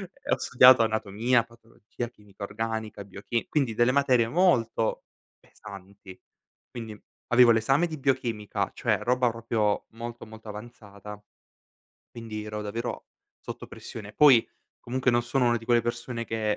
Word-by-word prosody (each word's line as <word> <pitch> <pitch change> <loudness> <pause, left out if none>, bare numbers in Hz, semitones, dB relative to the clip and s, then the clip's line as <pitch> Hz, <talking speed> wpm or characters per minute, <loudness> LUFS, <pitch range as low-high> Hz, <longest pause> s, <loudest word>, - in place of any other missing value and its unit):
E 275 - -8
ho - - +1
studiato 130 -1 +6
anatomia, 110 +2 +1
patologia, 115 0 -9
chimica 105 -3 -14
organica, 110 0 -4
biochi 100 +4 -4
quindi 135 -7 0
delle 120 +2 +3
materie 130 -4 +3
molto 115 -8 +1 0.4
pesanti. 100 -2 -13 0.5
Quindi 110 -3 -8 0.3
avevo 120 -1 +6
l'esame 135 +9 +2
di 160 -2 -5
biochimica, 120 -6 -1
cioè - - 0
roba 125 0 +2
proprio 110 -2 -1
molto 120 +1 -8
molto 110 0 -12
avanzata, 105 -2 -10 0.9
quindi 110 -2 -7
ero 105 0 -5
davvero 115 +4 -5 0.3
sotto - - -8
pressione. 105 -2 -10
Poi 135 -6 +6 0.3
comunque 130 +1 0
non 120 0 +2
sono 120 +1 0
una 120 - +2
di 115 - -14
quelle 120 -1 +3
persone 120 0 -4
che 110 -2 -1
115 Hz, 140 wpm, -27 LUFS, 105-120 Hz, 0.9 s, studiato